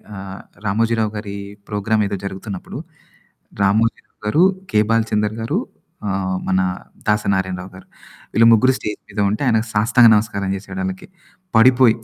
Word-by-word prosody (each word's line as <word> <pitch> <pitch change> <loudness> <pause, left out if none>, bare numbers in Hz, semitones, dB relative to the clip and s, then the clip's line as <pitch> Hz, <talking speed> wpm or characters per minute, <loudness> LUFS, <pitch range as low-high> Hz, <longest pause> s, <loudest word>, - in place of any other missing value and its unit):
ఆహ్, 95 0 -8 0.2
'రామోజీరావుగారి' 105 -1 -1 0.3
ప్రోగ్రామ్ 105 +1 0
ఏదో 100 - -3
జరుగుతున్నప్పుడు. 95 0 -6 0.8
'రామోజీ 110 +4 +2
రావుగారు' 110 +11 0 0.3
'కేె 105 - +4
బాల్చందర్‌గారు' 110 0 0 0.5
ఆహ్, 95 -1 -1
మన 95 0 +2 0.5
'దాసనారాయణరావుగారు' 95 -3 -1 0.5
వీళ్ళు 115 +2 +5
ముగ్గురు 130 +4 +4
స్టేజ్ 105 0 -5
మీద 100 +1 -6
ఉంటే, 105 - -2
ఆయనకు 110 -1 +2
సాష్టాంగ 115 +3 +5
నమస్కారం 105 -2 -1
చేసాడాళ్ళకి. 190 - -5 0.5
పడిపోయి 125 0 +6
105 Hz, 110 wpm, -20 LUFS, 100-115 Hz, 0.8 s, పడిపోయి